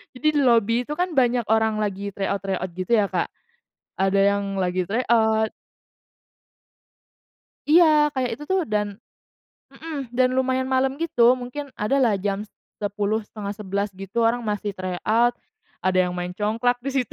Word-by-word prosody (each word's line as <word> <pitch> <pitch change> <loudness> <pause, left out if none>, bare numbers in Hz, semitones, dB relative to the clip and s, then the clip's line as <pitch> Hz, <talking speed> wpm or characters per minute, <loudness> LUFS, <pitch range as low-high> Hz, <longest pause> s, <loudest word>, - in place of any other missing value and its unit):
jadi 305 +4 -1
di - - +4
lobi 230 -1 +3
itu 300 - -4
kan 360 +3 -1
banyak 245 -2 +3
orang 220 -1 +2
lagi 200 -1 -3
tryout-tryout 195 -1 -2
gitu, 185 +5 -4
ya, - - +2
Kak. - - -1 0.7
Ada 195 +1 +2
yang 200 0 -1 0.2
lagi 180 0 0
tryout 220 -1 +2 2.2
Iya, 305 -2 +6
kayak 255 -2 0
itu - - -7
tuh 380 -1 +2
dan 210 -3 -2 0.8
mhm, 295 -6 -6
dan, 255 0 +4
lumayan 260 0 0
malam 265 +1 +1
gitu, 250 -7 +4
mungkin 255 +4 -6
ada 235 +7 0
lah 230 -5 +3
jam 200 +1 -2 0.4
10.00, 205 +1 -1
10.30, 205 -1 -4
gitu, 195 +5 -2
orang 235 +2 +2
masih 205 -1 -2
tryout, 215 +6 +1 0.5
ada 185 0 +1
yang - - -4
main 180 0 -4
congklak 230 +4 +1
di 275 - -2
situ, - - -15
220 Hz, 145 wpm, -23 LUFS, 200-255 Hz, 2.2 s, Iya